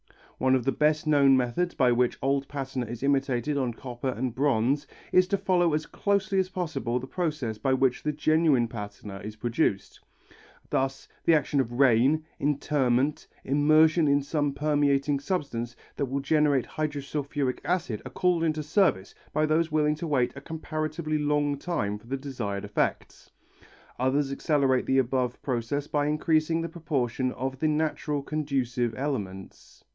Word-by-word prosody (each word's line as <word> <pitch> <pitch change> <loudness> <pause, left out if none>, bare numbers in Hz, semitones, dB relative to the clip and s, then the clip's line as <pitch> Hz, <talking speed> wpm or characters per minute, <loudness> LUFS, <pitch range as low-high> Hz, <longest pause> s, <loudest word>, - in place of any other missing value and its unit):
One 130 0 +3
of 130 - 0
the 135 - +2
best 150 +2 +1
known 140 -3 +5
methods 130 +8 -1
by 125 -2 +3
which 120 0 +1
old 140 0 0
patina 135 -3 -4
is 120 +2 -7
imitated 135 0 +1
on 125 -4 -1
copper 125 +1 -5
and 125 -1 -2
bronze, 135 +1 +1 0.2
is 185 0 +5
to 200 - +1
follow 175 -4 +2
as 155 0 -2
closely 200 -1 0
as 185 -1 0
possible 155 -10 -2
the 130 - -7
process 145 -9 -3
by 130 +4 +1
which 130 -1 +2
the 150 - -1
genuine 150 -4 +2
patina 105 -3 -8
is 105 +1 -7
produced. 115 -2 -1 0.7
Thus 135 0 -1 0.2
the 165 - +6
action 145 -1 +1
of 120 -3 -1
rain, 135 +4 +3
interment, 140 -1 +1 0.2
immersion 155 +3 +4
in 140 0 +3
some 145 -1 -1
permeating 145 -1 +1
substance 135 -8 -3 0.2
that 140 - 0
will 135 +2 -2
generate 145 -2 +2
hydrosulphuric 145 -2 -3
acid 160 - -1
are 130 - -7
called 175 +5 +1
into 155 -1 0
service 150 - +1 0.2
by 155 - +2
those 160 +1 +1
willing 150 -1 +2
to 155 +2 -5
wait 130 -5 +1
a 140 - -8
comparatively 155 0 -3
long 145 -1 +1
time 105 - -2
for 115 - -19
the 135 +2 -2
desired 120 -8 -4
effects. 105 - -2 0.7
Others 135 +2 +1
accelerate 135 -3 +1
the 135 - +2
above 125 -1 0
process 130 +2 -2
by 145 -1 0
increasing 155 +1 +1
the 165 - -2
proportion 135 -6 -1
of 130 +1 -4
the 155 - +1
natural 150 -1 -1
conducive 130 -6 -1
elements. 100 -9 -5
140 Hz, 160 wpm, -27 LUFS, 125-155 Hz, 0.7 s, the